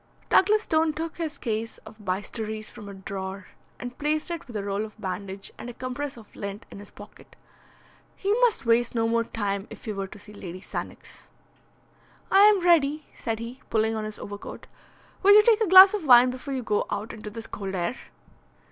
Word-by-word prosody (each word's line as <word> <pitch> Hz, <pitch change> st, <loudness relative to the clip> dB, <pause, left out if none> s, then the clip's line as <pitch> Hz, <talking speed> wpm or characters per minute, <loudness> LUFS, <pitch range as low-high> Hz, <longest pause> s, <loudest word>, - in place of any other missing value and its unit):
Douglas 425 Hz, +3 st, +5 dB
Stone 315 Hz, -3 st, +2 dB
took 325 Hz, +2 st, -5 dB
his 315 Hz, -4 st, -4 dB
case 225 Hz, -2 st, -3 dB
of 220 Hz, -, -13 dB
bistouries 215 Hz, +3 st, -4 dB
from 205 Hz, -1 st, -10 dB
a -, -, -8 dB
drawer, 190 Hz, 0 st, -6 dB, 0.3 s
and 245 Hz, 0 st, -8 dB
placed 305 Hz, +2 st, 0 dB
it 340 Hz, -, -5 dB
with 240 Hz, -, -11 dB
a 205 Hz, -, -2 dB
roll 200 Hz, +1 st, -2 dB
of 220 Hz, 0 st, -10 dB
bandage 195 Hz, 0 st, -5 dB
and 245 Hz, -, -7 dB
a 240 Hz, -, -9 dB
compress 260 Hz, +2 st, -5 dB
of 220 Hz, -2 st, -15 dB
lint 200 Hz, 0 st, -6 dB
in -, -, -9 dB
his 205 Hz, -, -11 dB
pocket. -, -, -15 dB, 0.8 s
He 400 Hz, +1 st, 0 dB
must 455 Hz, -, +3 dB
waste 235 Hz, +1 st, +2 dB
no 225 Hz, -1 st, +2 dB
more 230 Hz, 0 st, +2 dB
time 200 Hz, -3 st, -3 dB
if -, -, -11 dB
he 215 Hz, -, -3 dB
were 195 Hz, -1 st, -4 dB
to 210 Hz, -, -12 dB
see 205 Hz, +1 st, -13 dB
Lady 185 Hz, -3 st, -8 dB
Sannox. -, -, -8 dB, 1.0 s
"I 390 Hz, -, +6 dB
am 420 Hz, -3 st, +5 dB
ready," 310 Hz, -4 st, +3 dB
said 225 Hz, -2 st, -3 dB
he, 235 Hz, +3 st, -8 dB
pulling 220 Hz, 0 st, +1 dB
on 215 Hz, -1 st, -3 dB
his 215 Hz, 0 st, -7 dB
overcoat. 205 Hz, 0 st, -8 dB, 0.6 s
"Will 405 Hz, +1 st, +7 dB
you 425 Hz, -, +8 dB
take 450 Hz, -1 st, +4 dB
a 440 Hz, -, +3 dB
glass 375 Hz, +2 st, +10 dB
of 415 Hz, -5 st, -2 dB
wine 250 Hz, -2 st, +7 dB
before 265 Hz, +2 st, -5 dB
you 255 Hz, -, -3 dB
go 210 Hz, -1 st, 0 dB
out 215 Hz, -, -4 dB
into 215 Hz, -1 st, -8 dB
this 225 Hz, +1 st, -8 dB
cold 195 Hz, -2 st, -5 dB
air?" 175 Hz, -2 st, -1 dB
230 Hz, 200 wpm, -26 LUFS, 205-300 Hz, 1.0 s, glass